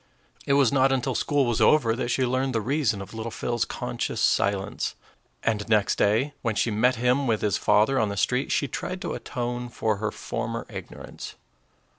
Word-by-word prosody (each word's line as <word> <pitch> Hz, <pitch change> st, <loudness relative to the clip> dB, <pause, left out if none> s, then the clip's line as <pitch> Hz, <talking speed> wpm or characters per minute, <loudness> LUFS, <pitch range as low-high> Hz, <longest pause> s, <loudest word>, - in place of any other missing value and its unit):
It 140 Hz, -, +3 dB
was 140 Hz, -4 st, +4 dB
not 135 Hz, -1 st, +3 dB
until 130 Hz, 0 st, 0 dB
school 145 Hz, +2 st, +1 dB
was 120 Hz, -1 st, 0 dB
over 115 Hz, -1 st, +4 dB
that 120 Hz, 0 st, -2 dB
she 130 Hz, +1 st, +1 dB
learned 130 Hz, +1 st, 0 dB
the -, -, +3 dB
reason 125 Hz, -4 st, 0 dB
of 95 Hz, -, -13 dB
little 110 Hz, +1 st, -4 dB
Phil's 120 Hz, +1 st, -2 dB
conscious -, -, -4 dB
silence; 100 Hz, -1 st, 0 dB, 0.5 s
and 110 Hz, -2 st, -1 dB
next 105 Hz, -3 st, +2 dB
day, 115 Hz, +8 st, +2 dB
when 115 Hz, -3 st, -1 dB
she 115 Hz, -, +1 dB
met 125 Hz, +5 st, +3 dB
him 125 Hz, +3 st, +1 dB
with 110 Hz, -2 st, +1 dB
his 105 Hz, -2 st, +1 dB
father 120 Hz, +6 st, +3 dB
on 110 Hz, -, +1 dB
the 100 Hz, -, -4 dB
street, 125 Hz, +7 st, 0 dB
she 140 Hz, -, +1 dB
tried 185 Hz, +8 st, -4 dB
to -, -, -3 dB
atone 120 Hz, -1 st, -4 dB
for 110 Hz, -3 st, -1 dB
her 105 Hz, +1 st, -1 dB
former 115 Hz, +2 st, -4 dB
ignorance. -, -, -8 dB
120 Hz, 190 wpm, -26 LUFS, 110-130 Hz, 0.5 s, was